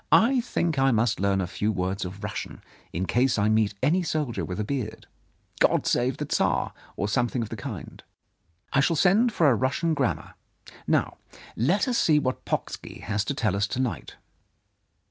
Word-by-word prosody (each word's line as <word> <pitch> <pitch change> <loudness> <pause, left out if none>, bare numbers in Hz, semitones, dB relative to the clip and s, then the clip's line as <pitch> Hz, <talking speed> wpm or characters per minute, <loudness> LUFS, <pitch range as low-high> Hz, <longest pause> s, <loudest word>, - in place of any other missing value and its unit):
I 250 +2 +5
think 170 - -1
I 135 0 +4
must 115 -1 +2
learn 100 0 +2
a - - -1
few 105 +4 -1
words 95 0 -2
of 95 +3 -8
Russian, 105 - -5 0.3
in 90 +3 -2
case 125 +4 +2
I 105 +1 +2
meet 110 -1 +2
any 165 +7 +3
soldier 150 -7 -2
with 90 +2 -4
a - - 0
beard 110 -1 -4 0.2
— - - -40
' - - -23
God - - +3
Save 125 +1 +1
the - - -3
Tsar! - - 0
' - - -25
or 100 - -1
something 120 +3 0
of 110 - -7
the - - -5
kind. 95 - -7 0.7
I 140 - +4
shall 165 +4 +3
send 200 +9 +4
for 165 -7 +3
a 135 - +6
Russian 135 +7 0
grammar. - - -1 0.5
Now, - - +1 0.4
let 175 - +2
us 245 -2 +1
see 155 -2 +4
what 130 -3 -1
Pocksky - - -4
has 105 -1 -1
to 140 - -2
tell 110 -6 0
us 100 0 +1
to 120 - -4
night." 120 - -3
120 Hz, 200 wpm, -26 LUFS, 105-150 Hz, 0.7 s, a